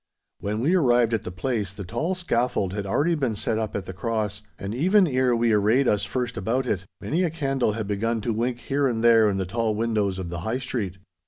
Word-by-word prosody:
When 105 +2 -2
we 155 +8 +2
arrived 120 -9 +3
at 110 - +1
the 90 - -6
place 100 +1 -2
the 100 0 -7
tall 120 - -2
scaffold 125 - 0
had 100 -1 -3
already 150 - +2
been 135 -8 0
set 110 +2 -1
up 110 -2 -3
at 100 - -3
the 95 - -6
cross, 105 0 -2 0.2
and 100 +1 -5
even 185 - +4
ere 130 -5 +2
we 115 -1 +2
arrayed 110 +6 +3
us 105 -3 +2
first 125 -2 -3
about 120 +7 0
it, 95 -6 -2
many 165 +5 -1
a 180 - +2
candle 135 -8 0
had 110 0 -3
begun 110 +3 -1
to 115 +2 -1
wink 120 +2 -1
here 140 +3 +1
and 115 -3 -1
there 115 -2 +6
in 100 - -1
the 95 - -1
tall 110 +3 -1
windows 105 -4 0
of 90 -2 -5
the 85 0 -4
High 110 +7 -2
Street. 115 -8 -3
115 Hz, 235 wpm, -25 LUFS, 100-130 Hz, 0.2 s, there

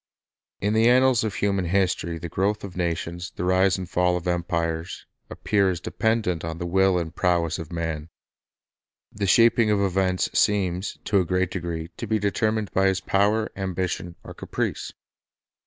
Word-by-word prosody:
In 105 +1 +1
the 110 +2 +4
annals 130 -1 +4
of 110 -2 -3
human 100 -2 0
history 90 -2 0
the 85 - -6
growth 100 +5 -1
of 100 -3 -8
nations, 85 0 -3
the - - -4
rise 95 +1 +3
and 95 -1 -5
fall 90 0 +1
of 90 +1 -6
empires, 85 -1 -2 0.2
appear 100 -2 +1
as 90 -2 -2
depend 110 +4 -1
ent 85 -3 -1
on 80 0 -4
the 90 - -4
will 95 +1 +3
and 85 -2 -4
prowess 85 -2 +1
of 80 -1 -7
man. 80 -2 -4 1.0
The 100 -1 -3
shaping 115 +1 +5
of 105 -1 +2
events 95 -1 0
seems, 95 -2 +1
to 100 -2 +3
a 90 - +1
great 90 +1 0
degree, 85 -3 -4
to 115 - -5
be 110 +1 +1
determined 110 0 0
by 95 +1 +2
his 95 0 +1
power, 105 +3 +1
ambition, 95 -2 -3
or - - -9
caprice. - - -4
95 Hz, 170 wpm, -24 LUFS, 85-100 Hz, 1.0 s, shaping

